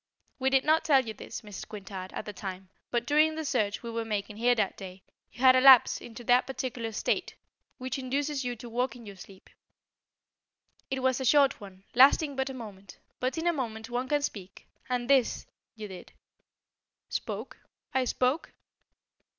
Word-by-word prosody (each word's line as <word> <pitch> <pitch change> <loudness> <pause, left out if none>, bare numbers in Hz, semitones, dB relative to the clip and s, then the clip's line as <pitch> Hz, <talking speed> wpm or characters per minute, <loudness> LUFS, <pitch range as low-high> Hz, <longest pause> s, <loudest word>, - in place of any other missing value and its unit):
We 265 0 +2
did 265 0 +3
not 315 +1 +4
tell 275 -5 +4
you 220 - -5
this, 220 - -8
Mrs. 210 -3 -9
Quintard, 190 -3 -8
at - - -5
the 210 - -6
time, 190 -1 -7 0.2
but 240 -1 -1
during 305 +3 +3
the 315 0 -4
search 220 -7 -1
we 235 - -5
were 230 0 -2
making 210 -1 -4
here 245 +2 +3
that 210 -4 0
day, 185 -1 -10 0.3
you 245 - -12
had 260 -1 +7
a 255 - +5
lapse 265 -2 +7
into 240 +1 -10
that 245 +2 +3
peculiar 250 -4 -4
state 215 - -1 0.4
which 260 +1 -4
induces 275 +2 -2
you 245 -1 -3
to 240 - -10
walk 240 +1 -1
in 240 -2 -12
your 200 -1 -9
sleep. 190 +1 -14 1.4
It 265 -1 -3
was 260 0 +2
a - - -1
short 275 -1 +4
one, 195 -1 -12
lasting 280 +3 +5
but 265 +1 -1
a - - -5
moment, 200 -5 -10 0.2
but 255 +5 -1
in 325 - -2
a 345 - +3
moment 230 -5 -5
one 245 +2 -2
can 290 -1 +1
speak, 195 -8 -6 0.2
and, 245 -1 -1
this 270 -3 +2 0.3
you 215 -1 -7
did 190 -2 -11 0.5
" - - -62
"Spoke? - - -7 0.4
I 260 -1 +2
spoke?" 255 +5 0
245 Hz, 190 wpm, -29 LUFS, 210-265 Hz, 1.4 s, had